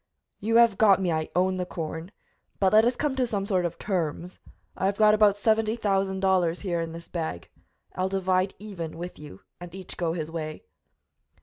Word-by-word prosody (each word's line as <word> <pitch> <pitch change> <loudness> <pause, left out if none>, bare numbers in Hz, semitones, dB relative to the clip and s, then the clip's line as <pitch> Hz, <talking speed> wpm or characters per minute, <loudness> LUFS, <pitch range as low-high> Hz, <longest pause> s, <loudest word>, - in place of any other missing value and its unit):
"You 225 +3 0
have 230 -4 +5
got 200 -4 +6
me; 185 -3 0
I 155 -1 -1
own 185 +1 +2
the 180 - -1
corn. 165 0 -5 0.5
But 190 0 +3
let 220 +1 +7
us 245 +1 +2
come 290 -3 -1
to 255 -2 +1
some 200 -4 -2
sort 185 -4 +1
of 170 - -3
terms. 175 -2 -3 0.4
I 190 - 0
have 200 0 -1
got 215 -1 +6
about 210 -1 +4
seventy 220 +1 +2
thousand 195 -3 0
dollars 180 -3 +2
here 175 -4 -1
in 165 0 -4
this 170 +1 -9
bag; 160 - -5 0.4
I'll 185 +1 -1
divide 190 0 0
even 175 -7 -7
with 175 +2 -7
you 145 -11 -11 0.2
and 175 0 -9
each 190 -2 -9
go 165 -2 -1
his 160 -2 -4
way." 155 -2 -5
185 Hz, 200 wpm, -26 LUFS, 170-205 Hz, 0.5 s, let